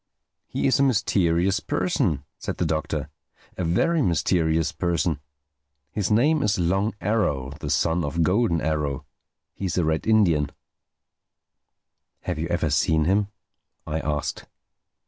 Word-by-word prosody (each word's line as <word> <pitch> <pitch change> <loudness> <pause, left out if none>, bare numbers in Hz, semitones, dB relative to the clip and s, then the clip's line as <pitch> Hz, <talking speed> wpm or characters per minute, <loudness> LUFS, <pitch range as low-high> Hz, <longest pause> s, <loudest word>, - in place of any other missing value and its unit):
"He - - -2
is 135 - +3
a - - +4
mysterious 95 -7 +2
person," 85 -5 0 0.2
said - - -4
the - - 0
Doctor—"a 75 +2 -5
very 155 - +2
mysterious 80 - +1
person. 85 -3 -1 0.7
His 100 -4 -1
name 145 +8 +3
is 105 - +1
Long 95 +5 0
Arrow, 75 - 0
the - - -5
son 85 +1 +1
of 80 +3 0
Golden 90 -2 +2
Arrow. 75 -3 -1 0.5
He 100 - -5
is 90 - -2
a 90 - +2
Red 80 +4 -1
Indian." 85 -10 +3 1.7
"Have 90 -3 -3
you 80 - -1
ever 85 -3 0
seen 80 0 +2
him?" 100 +3 +2 0.6
I 80 +1 -2
asked. 75 -2 -3
85 Hz, 130 wpm, -24 LUFS, 80-100 Hz, 1.7 s, a